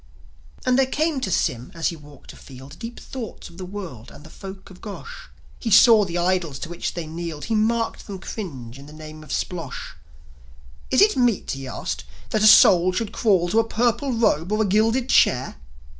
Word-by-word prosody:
And 255 0 +3
there 265 - +3
came 300 0 -1
to 200 - -2
Sym 125 -7 -1
as 165 - 0
he 170 - -6
walked 145 -3 -14
afield 135 +4 -13
Deep 230 +1 -7
thoughts 245 -5 -8
of 170 - -15
the 185 - -5
world 180 - -8
and - - -14
the 155 - -14
folk 195 -1 -10
of 180 - -15
Gosh. 230 - -9 0.3
He 230 - -3
saw 220 0 +7
the 175 -1 -4
idols 175 -5 0
to 165 - -7
which 175 - -4
they 170 -2 -4
kneeled; 160 -1 -6
He 225 - -2
marked 225 +1 0
them 200 -2 -6
cringe 140 - -7
to - - -12
the 145 +2 -13
name 155 0 -10
of 155 - -16
Splosli. 175 -2 -4 1.0
Is 260 - +3
it 425 - +3
meet," 245 -5 +1
he 135 -1 -6
asked, 60 - -4 0.3
"that 215 - +1
a 215 - +6
soul 185 -3 +7
should 215 +2 -2
crawl 190 -7 +2
To 220 - +3
a - - +4
purple 240 +4 0
robe 210 -7 +1
or 215 +1 +2
a - - -1
gilded 225 +6 +2
chair?" 130 - +3
190 Hz, 205 wpm, -23 LUFS, 155-225 Hz, 1.0 s, saw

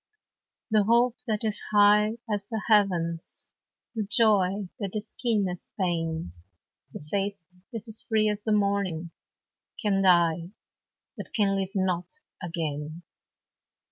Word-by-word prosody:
The 215 -2 +3
hope 235 +2 +3
that 215 -1 -1
is 215 -2 +5
high 210 +1 +4
as 205 -2 -2
the 220 0 -3
heavens, 175 -6 +1 0.4
The 225 - -2
joy 205 -3 +2
that 200 -2 -4
is 215 +1 -3
keen 220 -5 0
as 180 -1 -6
pain, 165 - -2 0.6
The 150 - -9
faith 200 0 -3 0.3
that 225 -4 -4
is 220 0 +4
free 215 -1 +3
as 210 0 -1
the 215 - -2
morning, 200 -5 0 0.7
Can 200 -3 +1
die 170 -2 +3 0.7
but - - -9
can 200 -3 +2
live 195 0 -3
not 180 -2 -1 0.3
again. 160 -2 -4
200 Hz, 130 wpm, -27 LUFS, 175-215 Hz, 0.7 s, is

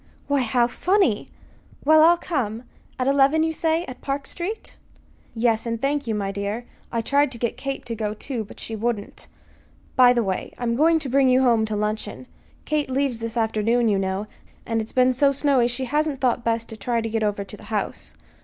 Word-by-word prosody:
"Why, 285 -1 +2
how 245 0 +2
funny! 305 - +1 0.6
Well, 310 +1 +7
I'll 340 +2 +6
come. 250 - -3 0.3
At 255 - -1
eleven, 280 +3 +4
you 320 0 0
say, 325 +2 0
at 255 - -9
Park 275 0 -3
Street?" 400 +6 -5 0.6
"Yes; 230 0 +1
and 230 -1 -2
thank 280 +1 -1
you, 220 - 0
my 200 -1 -2
dear. 200 +4 -4 0.3
I 230 - 0
tried 280 +3 +2
to - - -5
get 235 0 -2
Kate 275 -2 -5
to 235 - -4
go, 215 -1 -3
too; 235 +1 -4
but 205 - -13
she 225 - -5
wouldn't. 220 -1 -3 0.7
By 250 -1 +7
the 240 -2 +2
way, 190 -2 -3
I'm 235 -1 -1
going 325 +5 +4
to 305 -3 -4
bring 270 +1 +4
you 255 +1 +4
home 230 -3 +3
to 215 -1 -3
luncheon. 210 +4 -3 0.4
Kate 300 -2 0
leaves 265 -2 0
this 230 +1 -5
afternoon, 225 +1 +2
you 200 -2 +2
know, 190 +1 -2 0.4
and 225 -1 0
it's 220 - -7
been 255 0 +3
so 275 +2 +3
snowy 275 -3 +2
she 245 +2 -3
hasn't 295 +1 0
thought 250 -1 +1
best 230 0 0
to 220 - -8
try 235 +3 -1
to 225 - -2
get 225 0 -1
over 205 -1 0
to 200 - -10
the 210 - -14
house. 210 -1 -4
240 Hz, 210 wpm, -23 LUFS, 220-275 Hz, 0.7 s, Well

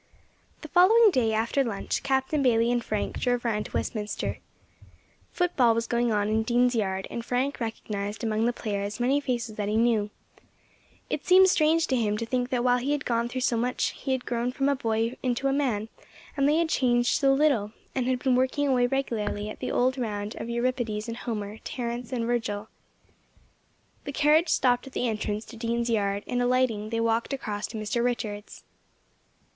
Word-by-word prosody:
THE 310 - -8
following 405 +7 +6
day, 245 -8 +2
after 230 +5 +1
lunch, 225 -6 -3
Captain 270 +2 0
Bayley 235 -2 +3
and 240 -1 0
Frank 215 -2 -3
drove 245 -1 0
round 210 -2 -1
to - - -18
Westminster. 210 -2 -3 0.9
Football 265 -10 +2
was 230 0 0
going 235 0 0
on 205 -1 +1
in 220 +1 +1
Dean's 245 +2 +2
Yard, 190 -4 -1
and 235 - -4
Frank 255 +4 -1
recognised 210 -2 -4
among 220 0 +1
the - - +2
players 205 -2 -4
many 260 +4 +2
faces 240 -5 -3
that 205 -1 -2
he 215 - +1
knew. 225 -3 +2 1.0
It - - -2
seemed 375 +1 +7
strange 325 -1 +3
to 265 - 0
him 210 -4 0
to 230 - -3
think 245 +1 -1
that 250 -3 0
while 250 0 +3
he 275 +4 -1
had 290 -2 -3
gone 235 0 0
through 255 +1 -4
so 240 -2 +1
much, 250 +2 0 0.2
and 265 - +2
had 260 -1 -3
grown 240 0 -1
from 270 +2 0
a 280 - +2
boy 225 0 -1
into 255 +1 0
a 270 - +1
man, 240 -7 0 0.5
that 280 -1 +2
they 300 - +3
had 335 -1 +1
changed 240 -4 +2
so 275 -2 +4
little, 270 -7 +2 0.2
and 255 -2 -1
had 255 -1 +1
been 260 -2 +3
working 260 +3 +1
away 250 -2 +3
regularly 215 -5 -2
at - - -10
the - - -3
old 255 +2 +1
round 210 -2 -3
of 230 - -5
Euripides 235 -3 -1
and 230 - -5
Homer, 215 -3 -5
Terence 240 0 -4
and 240 -3 -1
Virgil. 220 -3 -2 1.4
The 285 - -4
carriage 305 +4 +3
stopped 245 0 +2
at 265 - -11
the 245 - -1
entrance 215 -1 -2
to 230 - -12
Dean's 235 +1 -1
Yard, 200 -2 0
and, 245 0 -1
alighting, 245 -4 +1
they 230 0 -1
walked 230 +3 0
across 210 -6 -3
to 225 - -7
Mr. 215 +2 -1
Richards'. 215 -4 -3
240 Hz, 195 wpm, -27 LUFS, 220-260 Hz, 1.4 s, seemed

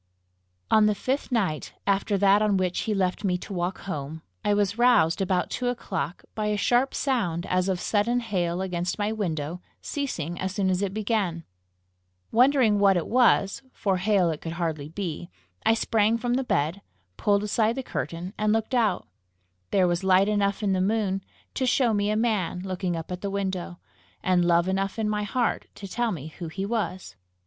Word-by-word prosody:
On 215 -1 +6
the 210 - +2
fifth 265 +6 -2
night 190 -11 -1
after 200 +1 +1
that 200 +1 +5
on 210 -2 +3
which 185 -1 0
he - - +2
left 185 +1 0
me 180 -3 +1
to 195 - -8
walk 180 +1 -2
home, 155 -3 -5 0.2
I 210 - +1
was 205 +1 +1
roused, 220 -9 +4
about 185 -2 0
two 250 - -2
o'clock, 180 - -3
by 215 -1 -2
a 210 0 0
sharp 245 +5 +2
sound 185 - 0
as 185 +1 +1
of 185 -2 0
sudden 230 +5 +1
hail 185 -5 -1
against 175 -1 -2
my 210 0 0
window, 170 -5 -3 0.2
ceasing 175 - -4
as 190 0 -3
soon 190 -2 +1
as 185 +1 0
it 200 -2 -1
began. 205 -6 -1 0.9
Wondering 245 -3 +4
what 195 -2 +5
it 170 - -1
was, 245 -2 +3
for 195 -3 0
hail 185 -2 +2
it 155 - -6
could 165 - -5
hardly 160 -4 -3
be, 170 -1 -5 0.4
I 225 - +5
sprang 220 0 +2
from 240 +1 -1
the 265 +2 +1
bed, 165 - 0 0.3
pulled 205 0 +2
aside 220 +2 +1
the 265 - -3
curtain, 175 -4 -4
and 215 0 +2
looked 225 +2 0
out. 235 -4 +1 0.6
There 185 -2 +3
was 175 +1 0
light 190 +1 +4
enough 205 0 0
in 195 -2 +2
the 185 - +1
moon 195 -1 0 0.3
to 260 - -1
show 245 -2 +3
me 205 0 +1
a 215 - +1
man 215 -6 0
looking 185 -1 -2
up 165 +2 -6
at 180 - -4
the 200 - -2
window, 190 -3 -3 0.5
and 180 -1 +3
love 170 0 +3
enough 195 +2 -1
in 220 -1 0
my 210 0 0
heart 235 +4 -1
to 200 - -8
tell 240 +4 -1
me 160 -5 -5
who 170 - -4
he 190 +5 -4
was. 200 - -3
195 Hz, 190 wpm, -26 LUFS, 180-215 Hz, 0.9 s, On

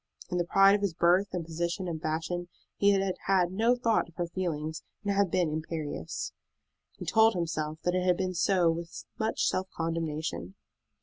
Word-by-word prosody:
In 180 - 0
the 175 - +1
pride 195 +2 +6
of 205 - +2
his 195 -5 -1
birth, 180 +4 +4
and 175 -3 -3
position, 170 +3 -2
and 160 -2 -4
fashion, 165 +3 -2 0.3
he 200 - +3
had 195 -1 +2
had 185 -2 +3
no 225 +6 +3
thought 230 -7 +1
of 165 - -21
her 175 - -1
feelings, 160 -3 -3 0.2
and 200 -1 0
had 200 -1 +2
been 170 -2 +1
imperious. 155 0 -4 0.6
He - - -7
told 225 -1 +4
himself 155 -3 -2
that 175 - +1
it 185 0 +1
had 180 -1 +3
been 185 -1 -1
so 175 -1 +3
with 170 +1 -6
much 220 0 0
self 190 0 0
condemnation. 160 - -3
175 Hz, 185 wpm, -29 LUFS, 165-190 Hz, 0.6 s, pride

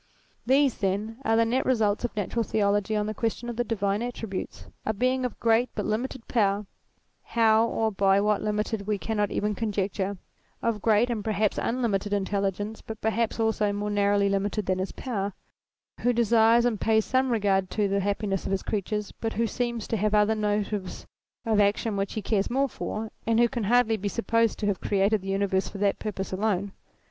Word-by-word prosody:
These, 270 0 +3
then, 210 +3 -1
are 225 - +2
the 230 0 +4
net 245 +3 +1
results 220 -5 +1
of 240 - -3
Natural 215 +3 -1
Theology 205 -1 +1
on 210 0 0
the 215 - -3
question 230 +2 -2
of 240 - -4
the 240 - 0
divine 205 -3 -1
attributes. 225 -5 -5 0.2
A 220 - -1
Being 255 +4 +1
of 250 - -5
great 230 +1 +3
but 210 - -2
limited 235 +3 -3
power, 205 -3 +1 0.6
how 225 0 +3
or 220 -1 0
by 195 0 +3
what 210 0 +1
limited 210 -1 -2
we 210 -1 +1
cannot 210 0 -1
even 210 0 -1
conjecture; 200 -2 -2 0.4
of 225 -3 -1
great, 225 +3 +3
and 220 -3 -2
perhaps 215 -1 0
un 250 +2 -1
limited 205 -2 0
intelligence, 200 +1 -1
but 220 -1 -8
perhaps, 220 +1 0
also, 220 -2 +1
more 205 +1 -2
narrowly 200 0 +2
limited 200 +1 -1
than 185 0 0
his 190 - -2
power: 205 -6 -3 0.7
who 245 +1 +2
desires, 230 0 +4
and 230 -4 0
pays 220 -1 +3
some 260 0 +1
regard 195 -4 +1
to, 210 0 0
the 200 0 +1
happiness 200 -1 -1
of - - -3
his 195 - -1
creatures, 210 0 -2
but 225 -1 -4
who 230 +2 +1
seems 235 -1 -2
to 225 - -1
have 210 +1 +1
other 210 +1 +4
motives 210 -2 -2 0.4
of 220 -2 +2
action 205 +1 +2
which 195 0 -2
he 215 - -4
cares 200 -1 0
more 270 +3 +1
for, 220 -3 -5 0.2
and 230 0 +3
who 240 - +6
can 235 -2 -3
hardly 230 0 +3
be 205 0 -2
supposed 230 +4 +1
to 210 - -3
have 205 -2 0
created 200 +1 +2
the 195 - -9
universe 195 -1 0
for 200 - -8
that 200 0 +1
purpose 195 -3 -4
alone. 200 0 0
210 Hz, 195 wpm, -27 LUFS, 200-230 Hz, 0.7 s, who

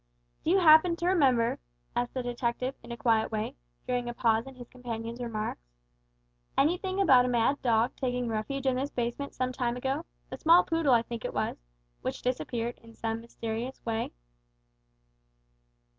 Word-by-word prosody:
"Do - - 0
you 375 - +5
happen 335 0 +7
to 340 - -4
remember," 270 -10 +3 0.4
asked 245 +1 -1
the 255 - -1
detective, 245 +1 -2
in 235 - -11
a 235 - -5
quiet 225 -1 +2
way, 215 -1 -2 0.3
during 245 -1 -1
a 240 - -5
pause 225 +1 +2
in 270 - -10
his 245 -2 -10
companion's 235 -1 -6
remarks, 215 - -3 1.0
"anything 370 +5 +1
about 265 -10 +6
a - - 0
mad 245 +3 +2
dog 230 0 +2
taking 250 -2 -1
refuge 230 +5 -3
in 260 -1 +2
this 275 +2 -1
basement 245 +3 -3
some 255 0 -1
time 245 -1 -1
ago 270 +5 -1 0.3
a - - -5
small 335 +2 +6
poodle 325 -6 +3
I 230 - +3
think 235 -1 -6
it - - -4
was - - -1 0.4
which - - -4
disappeared 240 -1 -2
in 230 0 -16
some 225 0 -3
mysterious 230 +2 -5
way?" 225 -1 -1
245 Hz, 170 wpm, -29 LUFS, 230-270 Hz, 1.0 s, happen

